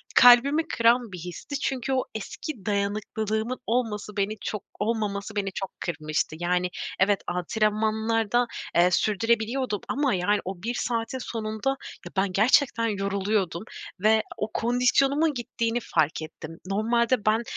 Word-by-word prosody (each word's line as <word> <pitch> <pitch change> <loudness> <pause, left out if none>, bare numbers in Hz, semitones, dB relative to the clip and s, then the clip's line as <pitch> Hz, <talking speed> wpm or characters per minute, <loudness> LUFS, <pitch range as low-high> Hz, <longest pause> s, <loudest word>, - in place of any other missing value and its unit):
kalbimi 275 +6 +7
kıran 235 - +3
bir 180 - -6
histi. 180 - -6
Çünkü 265 -1 -1
o 260 - +2
eski 220 - -6
dayanıklılığımın 215 +3 -1
olması, 215 -3 -1
beni 205 +2 0
çok 210 -3 -4 0.2
olmaması 210 -1 -2
beni 195 -1 -1
çok 195 0 -5
kırmıştı. 155 -2 -2
Yani, 180 +1 +1 0.3
evet 200 +1 +3
antrenmanlarda, 220 +5 +1 0.3
eee, 175 +1 +5
sürdürebiliyordum 220 +3 +1
ama 280 -3 +1
yani 195 +3 +2
o 185 -1 -6
1 235 +2 -1
saatin 230 +1 -2
sonunda 220 0 -3 0.4
ya, - - -8
ben 190 0 +2
gerçekten 230 +2 +3
yoruluyordum 200 -3 -1 0.4
ve 220 +2 +4
o 210 +1 -3
kondisyonumun 270 +6 +2
gittiğini 235 -1 -2
fark 160 -4 0
ettim. 160 +1 -9
Normalde 230 +4 +1
ben, 220 +2 +3
215 Hz, 130 wpm, -26 LUFS, 195-235 Hz, 0.4 s, kalbimi